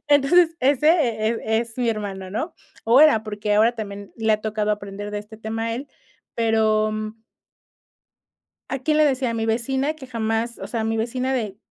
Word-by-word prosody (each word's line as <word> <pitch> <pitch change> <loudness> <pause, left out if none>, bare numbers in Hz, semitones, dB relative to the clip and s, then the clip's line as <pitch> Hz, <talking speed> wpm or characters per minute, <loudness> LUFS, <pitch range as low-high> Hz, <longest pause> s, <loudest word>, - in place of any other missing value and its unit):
Entonces, 320 +4 +4
ese 280 +3 +3
e 235 -10 +2 0.3
e - - +3
es 230 -1 -5
mi 245 -2 0
hermano, 195 -4 -3
¿no? 315 - -3 0.3
O 235 +4 +6
era, 300 -8 +6
porque 210 0 -2
ahora 225 +3 +4
también 200 -2 -7
le 220 -1 +2
ha 215 - +1
tocado 215 -1 -1
aprender 205 0 -4
de 210 - -3
este 210 +1 -11
tema 225 +1 -4
a 230 0 -1
él, 275 +4 -6 0.5
pero 220 -2 +2 1.8
¿a 270 - -3
quién 305 +3 +1
le 305 - +5
decía? 260 -3 +1
A - - -3
mi 225 -1 -1
vecina 265 +6 0
que 280 -4 -11
jamás, 230 0 -2
o - - -6
sea, 230 -2 -3
mi 225 0 -1
vecina 250 +4 -1
de 215 -7 -2
225 Hz, 190 wpm, -23 LUFS, 215-260 Hz, 1.8 s, O